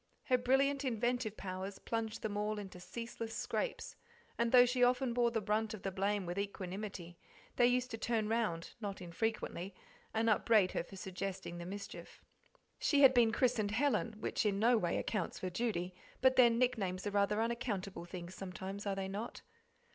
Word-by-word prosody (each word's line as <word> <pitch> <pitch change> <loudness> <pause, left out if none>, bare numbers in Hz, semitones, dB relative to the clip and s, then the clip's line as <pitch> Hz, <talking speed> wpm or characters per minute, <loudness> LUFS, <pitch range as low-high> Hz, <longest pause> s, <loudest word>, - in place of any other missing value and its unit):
Her 255 - +3
brilliant 275 +3 +2
inventive 240 -2 -1
powers 190 +1 -5
plunged 225 -1 -3
them 210 -2 -2
all 210 +1 -1
into 195 -3 -7
ceaseless 230 +3 -6
scrapes, - - -3 0.4
and 235 0 +1
though 250 -1 +9
she 250 0 +2
often 250 0 +3
bore 240 0 +3
the 225 -1 -1
brunt 215 +1 0
of 205 - -12
the 195 - -1
blame 200 +1 0
with 175 +3 -3
equanimity, 190 -3 -5 0.4
they 240 - +6
used 250 0 +1
to 225 - -5
turn 225 -2 0
round, 215 -7 -1
not 200 -2 -4
infrequently, 185 0 -3 0.4
and 225 +1 +1
upbraid 215 -3 +4
her - - -1
for 185 - -12
suggesting 190 -1 -5
the 170 - -6
mischief. 200 +2 -8 0.6
She 285 -2 +3
had 265 -1 +9
been 235 -3 +5
christened 235 -3 +2
"Helen," 235 -1 +1
which - - -1
in 205 -2 +1
no 235 +4 +4
way 175 -7 +1
account's 210 -6 -2
for 185 - -4
"Judy," 185 -3 -1 0.3
but 260 0 +5
then 235 -3 +6
nicknames 200 -7 0
are 205 - -1
rather 205 +1 +2
unaccountable 210 -6 -2
things 175 0 -7
sometimes, 195 +2 -6
are 195 - 0
they 195 0 -3
not? 205 +4 -5
215 Hz, 175 wpm, -35 LUFS, 190-235 Hz, 0.6 s, though